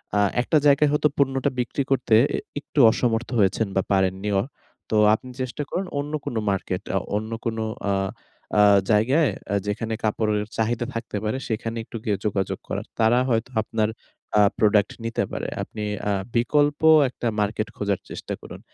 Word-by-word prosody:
আ - - +3 0.2
একটা 155 - +2
জায়গায় 145 +1 +5
হয়তো 150 0 +3
পণ্যটা 135 0 +2
বিক্রি 125 +3 -1
করতে 125 -4 +1 0.2
অ্যা - - 0 0.2
একটু 145 - -4
অসমর্থ 115 0 0
হয়েছেন 100 +2 +2
বা 95 - +3
পারেন 95 -1 +3
নিও। 100 -2 +1 0.5
তো - - 0 0.2
আপনি 125 +4 -3
চেষ্টা 130 +3 -3
করুন 185 +2 -2
অন্য 145 +2 -4
কোন 120 - -4
মার্কেট, 95 -1 -2
আ - - +4 0.2
অন্য 110 +2 -3
কোন 115 -1 -1 0.3
আ - - +2 0.7
আ - - +8 0.3
জায়গায় 130 +7 +3 0.2
আ 100 - +2
যেখানে 110 +2 -2
কাপড়ের 105 -1 0
চাহিদা 115 +1 0
থাকতে 115 -2 -4
পারে 110 +4 -1
সেখানে 115 +1 -3
একটু 115 - -8
গিয়ে 105 -3 0
যোগাযোগ 95 -2 -1
করার। - - -3
তারা 115 +2 +4
হয়তো 115 +1 0
আপনার 110 0 -1 0.5
আ 105 - +7 0.2
প্রোডাক্ট 105 -2 +3
নিতে 115 0 -1
পারে। - - -3 0.2
আপনি 110 - -7 0.3
আ - - +2 0.2
বিকল্প 145 +5 +2 0.3
একটা 120 -1 -4
মার্কেট 105 +1 0
খোঁজার 100 -2 -1
চেষ্টা - - -6
করুন। - - -10
115 Hz, 170 wpm, -24 LUFS, 105-125 Hz, 0.7 s, আ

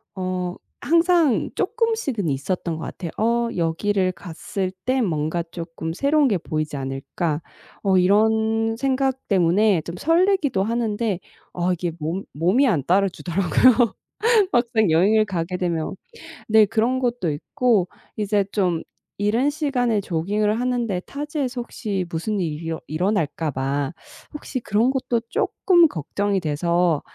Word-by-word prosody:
어 185 -1 -3 0.2
항상 335 -4 +3
쪼끔씩은 445 - -1
있었던 165 +4 -2
것 160 - -6
같아요. 170 -4 -6
'어 235 +1 +1
여기를 185 +3 0
갔을 185 +2 -5
때 260 +1 +2
뭔가 165 -3 -1
쪼끔 165 -1 -5
새로운 280 - +3
게 205 -7 +2
보이지 155 -2 -3
않을까?' 135 +4 -3 0.4
어 195 -2 +3
이런 220 +3 +2
생각 265 0 0
때문에 190 0 +3
좀 170 +2 -7
설레기도 330 - +2
하는데 225 -3 -1 0.3
어 180 +1 0
이게 175 0 -2
몸 165 +6 -3
몸이 185 - +3
안 160 - +1
따라 195 +3 +3
주더라고요, 195 +8 +3 0.6
막상 230 -5 +2
여행을 205 +7 +4
가게 180 -2 -3
되면. 170 -1 -2 0.5
네. 220 0 +6
그런 230 +5 +1
것도 240 -10 -1
있고 200 +5 +1 0.3
이제 205 -1 +1
좀 180 -6 0 0.4
이른 225 +7 +2
시간에 250 -8 0
조깅을 205 +5 0
하는데 240 -6 -1
타지에서 280 - -4
혹시 200 -6 -3
무슨 185 +5 -2
일이 160 -1 -3
일어 165 -1 -4
일어날까 160 -2 -1
봐 135 +3 -2 0.4
혹시 290 -3 -5
그런 225 +3 +1
것도 250 -3 -1
쪼끔 345 -3 +3
걱정이 195 - -2
돼서 170 +1 +1
200 Hz, 275 characters per minute, -22 LUFS, 170-240 Hz, 0.6 s, 네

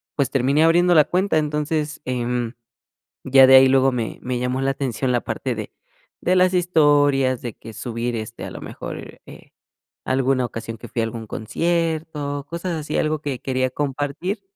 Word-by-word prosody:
pues 140 -3 +1
terminé 140 +3 +2
abriendo 175 +2 +4
la 155 -3 +6
cuenta, 185 -1 +1
entonces, 150 0 -2
em, 125 -1 -2 0.7
ya 135 0 +7
de 130 - +8
ahí 130 0 +8
luego 135 0 +4
me 120 -3 -4
me 125 -1 -3
llamó 125 +1 -1
la 135 0 +1
atención 130 -1 -2
la 120 -1 +1
parte - - -3
de - - -6 0.5
de 180 - +2
las 185 0 +4
historias, 145 -7 +3
de 120 -3 -4
que 115 - -12
subir, 120 0 -3
este, 110 +1 -6
a - - -5
lo - - -8
mejor, - - -8
eh, - - -14 0.5
alguna 130 -1 +1
ocasión 115 -1 -6
que - - -10
fui 120 - -2
a - - +1
algún 115 0 -6
concierto, 155 +2 -2
cosas 170 +2 -4
así, 150 -1 -3
algo 155 0 0
que 140 -4 -4
quería 130 -1 -1
compartir, 145 - -3
135 Hz, 175 wpm, -22 LUFS, 125-155 Hz, 0.7 s, de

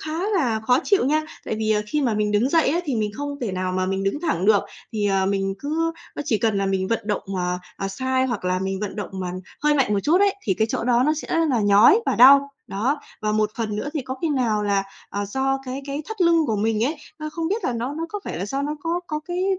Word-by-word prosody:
khá 315 +1 -4 0.2
là 240 - +1
khó 250 +4 +3
chịu 400 -7 +3
nha! 305 +4 +2 0.2
Tại - - -2
vì, 220 0 0
ờ, 210 -1 +2
khi 300 +8 -1
mà 240 -5 +1
mình 210 0 0
đứng 210 +5 +3
dậy 325 -2 +3
á 330 +5 +1
thì 280 - -1
mình 215 -1 0
không 285 +2 -5
thể 225 -6 -2
nào 185 0 -2
mà 185 0 0
mình 195 +1 -1
đứng 195 +9 -1
thẳng 315 - -1
được. 210 -2 +5 0.3
Thì, 210 -2 0
ờ, 195 -1 +2
mình 195 0 0
cứ 325 +5 -1 0.2
nó - - -2
chỉ 235 -8 +1
cần 220 -2 +1
là 195 - 0
mình 190 -1 0
vận 230 - 0
động 210 -1 -1
mà, 180 0 -1 0.2
à, 195 - -3
sai 260 +6 0
hoặc 240 -7 -3
là 180 0 +1
mình 190 0 -3
vận 210 0 -4
động 205 -3 -4
mà 185 -2 -4 0.3
hơi 300 0 +4
mạnh 270 -7 +2
một 200 - +2
chút 335 +6 +3
ấy, 400 -1 +4
thì 190 - 0
cái 220 +4 +1
chỗ - - -2
đó 245 0 +3
nó 305 - +4
sẽ 310 - -6 0.2
là 245 -4 +2
nhói 205 - +6
và - - +2
đau. 275 +3 +8 0.2
Đó, 255 +9 -1 0.2
và 215 0 +1
một 215 -1 +1
phần 215 -3 -2
nữa 215 - -3
thì 300 - -1
có 260 +1 -5
khi 330 - +1
nào 240 -7 +1
là, 200 -1 +1 0.3
ờ, 205 0 -3
do 265 +6 0
cái 260 +1 -5
cái 280 +2 -3
thắt 440 -2 -7
lưng 335 -3 +4
của 220 -4 0
mình 220 +2 +1
ấy, 305 +5 -1 0.2
ơ, 305 0 -4
không 325 0 -2
biết 420 +5 -2
là - - +1
nó 240 +4 -3
nó 330 +2 -3
có 415 +4 -5
phải - - -4
là 190 - -3
do 270 +6 -2
nó 300 +1 -2
có 335 +3 -1
có 305 -3 -3
cái, 355 +1 -1
235 Hz, 280 wpm, -23 LUFS, 205-295 Hz, 0.3 s, đau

